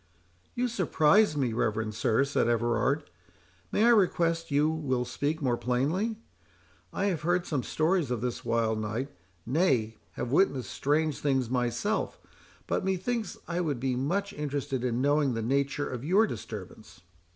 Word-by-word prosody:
"You 250 +1 +1
surprise 190 -4 +3
me, 130 -5 0
reverend 110 -1 -1
sir," 110 +3 +2
said 140 -4 +1
Everard;—"may 100 - -1
I - - +6
request 170 -6 +2
you 145 +1 +3
will 140 -6 -1
speak 145 +5 -2
more 120 -3 +1
plainly? 155 - 0 0.7
I 195 - -1
have 180 -6 0
heard 175 +2 +1
some 145 -5 -1
stories 160 +2 0
of 125 -2 -1
this 125 +1 -3
wild 115 -1 0
night, 110 +6 -3 0.4
nay, 125 -6 +1 0.2
have 120 - -4
witnessed 135 - +2
strange 150 +1 0
things 130 -4 0
myself; 125 - -1 0.5
but, - - -1
methinks, 195 +5 -2
I 175 +1 -1
would 145 -7 -1
be 130 0 0
much 185 +11 -1
interested 140 -3 -3
in 125 0 0
knowing 145 -3 +2
the 115 - -2
nature 140 +4 0
of 125 -1 -5
your 190 +9 +4
disturbance." 95 - -8
140 Hz, 150 wpm, -29 LUFS, 120-165 Hz, 0.7 s, I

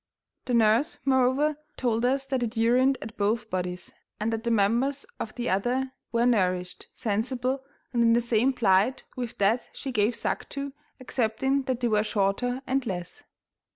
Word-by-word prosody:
The 250 - 0
nurse, 230 +9 +3
moreover, 270 +3 +3 0.2
told 235 -2 +1
us 270 +2 +1
that 270 -2 -1
it 235 0 -2
urined 250 +4 +4
at 220 +1 -8
both 215 +2 0
bodies, 180 -1 -3 0.3
and 220 +2 -1
that 225 0 -3
the 235 - -1
members 235 +6 +2
of 215 - -5
the 245 0 -3
other 245 +7 0 0.2
were 235 0 +2
nourished, 185 -6 0
sensible, 250 +5 -1 0.3
and 240 - +2
in 230 0 +5
the 235 - +4
same 240 +2 +2
plight 220 0 +2
with 245 -3 -5
that 210 +5 +2
she 270 - -5
gave 215 0 +2
suck - - -3
to, 280 0 -5 0.3
excepting 255 +2 0
that 255 -2 -2
they 240 - +2
were 210 -2 +2
shorter 220 +6 0
and 265 -1 0
less. 175 -3 -5
235 Hz, 170 wpm, -27 LUFS, 215-260 Hz, 0.3 s, in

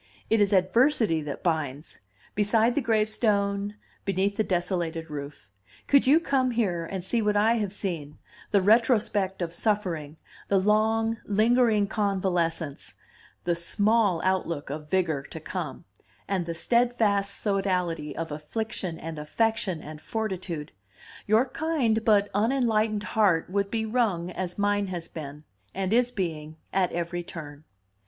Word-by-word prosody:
It 225 -1 +4
is 205 0 +3
adversity 200 - +3
that 145 -2 -6
binds 155 -4 -2 0.3
beside 220 +3 +2
the 290 - +1
gravestone, 210 -3 +1 0.3
beneath 195 +1 0
the 220 - +1
desolated 175 -4 -2
roof. 145 -6 -7 0.4
Could 280 -2 +4
you 295 +4 +6
come 270 -5 +1
here 190 -9 -1
and 190 -2 -5
see 230 +5 0
what 210 -1 +1
I 225 +3 +4
have 205 -4 -1
seen, 170 -8 -4 0.3
the 200 -2 +3
retrospect 210 -4 +3
of 165 -1 -4
suffering, 175 -7 -1 0.3
the 200 - +3
long, 220 +3 +2
lingering 220 0 +3
convalescence, 180 -7 -1 0.5
the 175 - +1
small 200 +2 +2
outlook 170 -6 -1
of 150 +1 -6
vigor 165 -6 +1
to 160 - -7
come, 165 -1 -5 0.4
and 185 -4 -1
the 170 - -3
steadfast 215 -1 +1
sodality 180 -6 -1
of 165 -1 -4
affliction 170 +3 -4
and 160 -1 -6
affection 205 +2 -1
and 155 0 -9
fortitude, 185 -9 -4 0.6
your 220 +4 +4
kind 255 -7 0
but 205 -2 +4
unenlightened 220 -1 +1
heart 185 -4 +2
would 200 0 0
be 220 +1 -1
wrung, 215 -7 0
as 180 -1 -4
mine 205 0 +1
has 175 -3 -5
been, 150 -1 -8 0.3
and 190 +1 -1
is 245 +1 +4
being, 160 -8 -4 0.2
at 185 -2 +2
every 175 +1 -3
turn." 155 -3 -9
195 Hz, 140 wpm, -27 LUFS, 170-220 Hz, 0.6 s, you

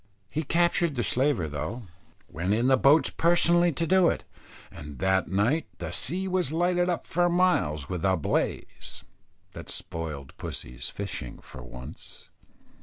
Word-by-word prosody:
He 155 - -1
captured 170 0 +1
that 120 - 0
slaver 130 - +1
though 95 +11 -5 0.4
went 90 +5 -1
in 115 +2 +1
the 135 - +6
boats 140 +4 +4
personally 175 +1 +4
to 165 +4 -1
do 185 0 +4
it, - - -2 0.5
and 75 -2 -9
that 95 +5 +1
night 110 - +1
the 85 -1 -5
sea 180 - -2
was 180 -6 0
lighted 175 +2 +1
up 175 - -2
for 175 0 +1
miles 170 - +1
with 90 -2 -4
a 95 -1 +3
blaze, 80 - -3 0.5
that - - -10
spoiled 75 -5 -6
pussy's - - -6
fishing 60 - -6
for - - -12
once. 60 +1 -11
130 Hz, 150 wpm, -27 LUFS, -, 0.5 s, the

